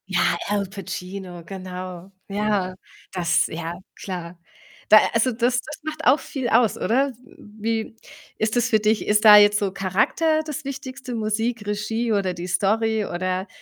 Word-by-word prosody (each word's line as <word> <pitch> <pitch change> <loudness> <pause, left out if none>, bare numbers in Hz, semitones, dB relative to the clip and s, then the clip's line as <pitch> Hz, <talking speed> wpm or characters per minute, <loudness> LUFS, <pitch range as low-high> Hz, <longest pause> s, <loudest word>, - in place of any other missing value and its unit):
Ja, 175 -2 +2
Al 205 -1 0
Pacino, 185 -2 -7
genau. 185 0 -8 0.2
Ja, 200 -2 -1 0.4
das 175 -3 +2
ja, 165 +1 -5 0.2
klar. 180 -2 -7 0.5
Da 215 - +10
also, 230 +3 +2
das 245 +2 +1
das 310 - -9
macht 310 0 -5
auch 270 +4 +5
viel 260 -4 -4
aus, 230 -1 +3
oder? 265 +5 +2 0.2
M 210 -3 -17
wie 225 +1 -2 0.4
ist 220 +1 0
das 240 -1 +2
für 220 - +4
dich? 215 +1 +1
Ist 210 0 +3
da 210 -1 +11
jetzt 205 0 +6
so 200 -2 -1
Charakter 220 - +1
das 300 -3 -6
Wichtigste, 260 -2 -6
Musik, 220 +1 -1
Regie 215 +3 -2
oder 195 -3 0
die 175 +1 -6
Story? 215 +3 +1
Oder, 185 +2 -2
210 Hz, 160 wpm, -23 LUFS, 185-230 Hz, 0.5 s, da